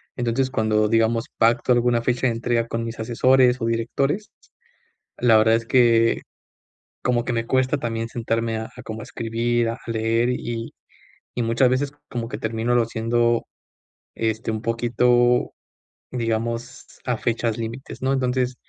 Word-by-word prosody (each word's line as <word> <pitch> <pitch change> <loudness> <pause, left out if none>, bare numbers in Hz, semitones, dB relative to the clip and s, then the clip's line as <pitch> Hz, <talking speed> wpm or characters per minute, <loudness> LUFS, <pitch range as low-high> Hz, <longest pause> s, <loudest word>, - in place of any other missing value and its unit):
Entonces, 125 +2 0
cuando 110 -2 +2
digamos 115 +1 +2
pacto 115 +2 +3
alguna 120 -1 +3
fecha 125 +1 +1
de 115 - +1
entrega 115 0 0
con 115 0 -3
mis 115 0 -6
asesores, 125 +2 +3
o 115 - -2
directores, 135 - -1 0.9
la 115 -3 +5
verdad 110 +1 +4
es 115 0 -2
que, 115 -2 +4 0.8
como 120 -1 +1
que 120 - -2
me 115 0 -1
cuesta 130 +3 +1
también 115 -2 -3
sentarme 115 -1 -2
a 110 - -5
a - - -9
como 110 0 -7
a - - -7
escribir, 115 -1 -1
a 115 - -6
leer, 115 +1 +1
y 120 -2 -4 0.6
y 120 - 0
muchas 115 +3 +3
veces 135 +2 0 0.2
como 120 -2 -4
que - - -5
termínolo 115 +2 0
haciendo, 115 +1 +1 0.7
este, 110 0 -1
un 110 0 -3
poquito, 120 +1 +2 0.6
digamos 115 +1 -3 0.2
a 125 -2 0
fechas 115 -1 -1
límites, 115 +4 -6
¿no? 135 +1 +1
Entonces 125 -1 0
115 Hz, 150 wpm, -23 LUFS, 115-125 Hz, 0.9 s, la